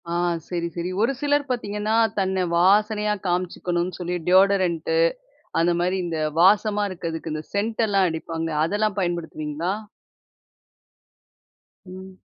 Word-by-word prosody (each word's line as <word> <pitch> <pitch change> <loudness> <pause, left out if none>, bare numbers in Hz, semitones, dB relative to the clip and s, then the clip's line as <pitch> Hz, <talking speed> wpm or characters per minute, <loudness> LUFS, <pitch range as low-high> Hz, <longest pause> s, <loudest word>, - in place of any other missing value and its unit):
ஆ. - - -2 0.4
சரி, 170 -1 -2
சரி. 175 +1 -3
ஒரு 235 +4 +3
சிலர் 290 -1 +1
பாத்தீங்கன்னா, 210 -2 -1 0.2
தன்னை 190 -1 0
வாசனையா 210 +3 +3
காமிச்சிக்கணும்னு 175 0 -1
சொல்லி 180 0 -2
டியோடரண்ட்டு 190 - +3 0.6
அந்த 170 +1 +3
மாரி 180 +2 +1
இந்த 165 -2 -3 0.2
வாசமா 210 +2 +4
இருக்கதுக்கு, 165 -3 -5
இந்த 155 0 -4
சென்ட்டெல்லாம் 205 -2 +1
அடிப்பாங்க. 165 0 -4 0.2
அதெல்லாம் 205 +3 -1
பயன்படுத்துவீங்களா? 170 -1 -2 2.1
ம். 185 0 -11
185 Hz, 105 wpm, -23 LUFS, 170-210 Hz, 2.1 s, வாசமா